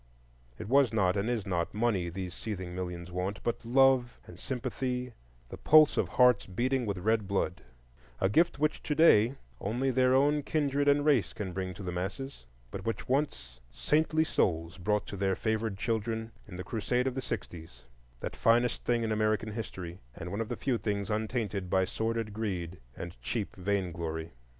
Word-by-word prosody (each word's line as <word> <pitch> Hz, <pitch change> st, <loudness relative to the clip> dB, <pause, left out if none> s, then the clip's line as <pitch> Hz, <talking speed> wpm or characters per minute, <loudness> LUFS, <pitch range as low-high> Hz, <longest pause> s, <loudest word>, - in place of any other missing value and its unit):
It -, -, -7 dB
was 135 Hz, +1 st, +4 dB
not 95 Hz, -5 st, +2 dB
and 100 Hz, +3 st, 0 dB
is 115 Hz, -5 st, -1 dB
not 85 Hz, -1 st, -2 dB
money 105 Hz, -6 st, +1 dB
these 90 Hz, 0 st, -5 dB
seething 95 Hz, -5 st, -5 dB
millions 90 Hz, -1 st, -5 dB
want, 95 Hz, +3 st, -2 dB
but 120 Hz, -, -2 dB
love 130 Hz, 0 st, +3 dB
and -, -, -12 dB
sympathy, 125 Hz, -1 st, -3 dB, 0.4 s
the -, -, -8 dB
pulse 155 Hz, -1 st, +6 dB
of -, -, +1 dB
hearts 125 Hz, -4 st, +4 dB
beating 120 Hz, +6 st, 0 dB
with 100 Hz, -1 st, -1 dB
red 110 Hz, +2 st, +1 dB
blood;—a 65 Hz, -6 st, -4 dB
gift 165 Hz, -, +3 dB
which 150 Hz, +1 st, 0 dB
to 150 Hz, -, -2 dB
day 130 Hz, -6 st, +6 dB, 0.2 s
only 125 Hz, +6 st, 0 dB
their 130 Hz, 0 st, +4 dB
own 145 Hz, +2 st, +3 dB
kindred 145 Hz, -1 st, 0 dB
and 145 Hz, 0 st, +4 dB
race 135 Hz, -, +3 dB
can 95 Hz, -4 st, -5 dB
bring 95 Hz, -1 st, -3 dB
to 100 Hz, -, -8 dB
the 90 Hz, -, -3 dB
masses, 95 Hz, -, -5 dB, 0.2 s
but -, -, -6 dB
which 115 Hz, 0 st, -3 dB
once 95 Hz, -, -1 dB
saintly 155 Hz, -, +2 dB
souls 85 Hz, -, 0 dB
brought 105 Hz, +3 st, 0 dB
to 100 Hz, -, -7 dB
their 95 Hz, 0 st, +1 dB
favored 110 Hz, -2 st, -1 dB
children 110 Hz, +1 st, -2 dB, 0.2 s
in 95 Hz, -, -9 dB
the 90 Hz, -, -5 dB
crusade 120 Hz, +4 st, -1 dB
of 130 Hz, -, 0 dB
the 130 Hz, -, -3 dB
sixties, 80 Hz, -, -6 dB, 0.4 s
that -, -, -4 dB
finest 120 Hz, +2 st, +2 dB
thing 120 Hz, -1 st, +1 dB
in 110 Hz, -, -1 dB
American 110 Hz, 0 st, +1 dB
history, 95 Hz, -5 st, -6 dB, 0.2 s
and 90 Hz, -, -6 dB
one 100 Hz, +3 st, -2 dB
of 115 Hz, -, -4 dB
the -, -, -3 dB
few 125 Hz, -4 st, 0 dB
things 100 Hz, -1 st, -2 dB
untainted 105 Hz, -3 st, -2 dB
by 95 Hz, +1 st, +3 dB
sordid 115 Hz, +1 st, -2 dB
greed 95 Hz, -5 st, -3 dB, 0.2 s
and -, -, -8 dB
cheap 105 Hz, -, -3 dB
vainglory. 85 Hz, -4 st, -2 dB
105 Hz, 180 wpm, -30 LUFS, 90-125 Hz, 0.4 s, pulse